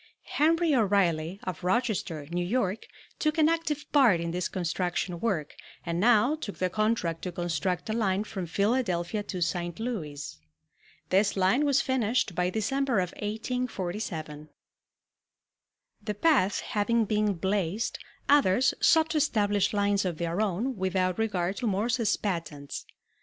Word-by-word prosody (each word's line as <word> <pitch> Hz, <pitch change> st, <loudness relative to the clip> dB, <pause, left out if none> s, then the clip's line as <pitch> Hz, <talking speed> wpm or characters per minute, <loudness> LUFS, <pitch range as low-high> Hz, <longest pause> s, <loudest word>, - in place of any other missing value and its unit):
Henry 325 Hz, +1 st, +3 dB
O'Reilly, 190 Hz, -, +1 dB
of 180 Hz, -3 st, -5 dB
Rochester, 185 Hz, -, -1 dB
New 175 Hz, +1 st, -1 dB
York, 205 Hz, 0 st, -1 dB, 0.3 s
took 305 Hz, +1 st, 0 dB
an 310 Hz, -1 st, +5 dB
active 320 Hz, -3 st, -1 dB
part 250 Hz, -, +5 dB
in 170 Hz, 0 st, -3 dB
this 180 Hz, +1 st, -1 dB
construction 180 Hz, 0 st, -2 dB
work 175 Hz, -9 st, -1 dB, 0.3 s
and 170 Hz, 0 st, -2 dB
now 240 Hz, +5 st, +4 dB
took 300 Hz, -10 st, -6 dB
the 185 Hz, -1 st, -1 dB
contract 215 Hz, -6 st, 0 dB
to 180 Hz, -, -4 dB
construct 175 Hz, +1 st, -2 dB
a 215 Hz, -, -1 dB
line 205 Hz, -3 st, +1 dB
from 190 Hz, -4 st, -5 dB
Philadelphia 200 Hz, -1 st, 0 dB
to 185 Hz, -3 st, -5 dB
St. 175 Hz, 0 st, -3 dB
Louis. 150 Hz, -, -5 dB, 0.7 s
This 195 Hz, +2 st, +2 dB
line 195 Hz, +10 st, +3 dB
was 280 Hz, -2 st, +3 dB
finished 245 Hz, -5 st, 0 dB
by 180 Hz, +1 st, 0 dB
December 255 Hz, +5 st, 0 dB
of 180 Hz, -2 st, 0 dB
1847. 200 Hz, -9 st, -4 dB, 1.5 s
The 210 Hz, 0 st, -4 dB
path 225 Hz, -, +3 dB
having 225 Hz, +2 st, +1 dB
been 210 Hz, -1 st, +1 dB
blazed, 190 Hz, +3 st, -1 dB, 0.3 s
others 265 Hz, -4 st, +4 dB
sought 320 Hz, -1 st, +4 dB
to 315 Hz, -, 0 dB
establish 205 Hz, -8 st, +2 dB
lines 205 Hz, -1 st, +1 dB
of 180 Hz, -4 st, -2 dB
their 170 Hz, +4 st, -1 dB
own 215 Hz, +5 st, -1 dB
without 185 Hz, 0 st, 0 dB
regard 195 Hz, -4 st, -1 dB
to 245 Hz, -, -2 dB
Morse's 220 Hz, +2 st, +1 dB
patents. 160 Hz, -7 st, -4 dB
200 Hz, 140 wpm, -28 LUFS, 175-235 Hz, 1.5 s, an